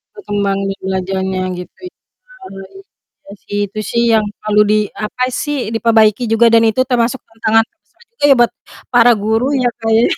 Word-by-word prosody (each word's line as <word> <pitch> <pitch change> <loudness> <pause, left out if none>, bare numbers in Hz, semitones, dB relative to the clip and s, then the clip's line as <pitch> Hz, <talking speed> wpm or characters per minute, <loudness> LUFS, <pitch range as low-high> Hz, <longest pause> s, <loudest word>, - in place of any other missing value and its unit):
Berkembang 205 - -2
ini 195 0 -2
belajarnya 190 0 -3 0.2
gitu 180 -1 -11
ya. - - -68 1.3
Iya - - -10
sih, 205 - -4
itu 215 +2 -6
sih 235 - +1
yang 220 -1 +3 0.2
selalu 210 0 +2
di 215 - +3 0.3
apa 250 +4 -2
sih, 295 +2 -3 0.2
diperbaiki 225 0 +3
juga 230 +1 +4
dan 230 0 +5
itu 220 +4 0
termasuk 245 +1 0
tantangan 225 0 +1
terbesar 345 +2 -31
juga 465 - -6
ya - - +8
buat 240 - +3 0.4
para 240 0 +6
guru 225 +3 +1
ya 250 -2 +1
Kak, 225 - -3
ya. 230 - +4
225 Hz, 170 wpm, -15 LUFS, 205-240 Hz, 1.3 s, ya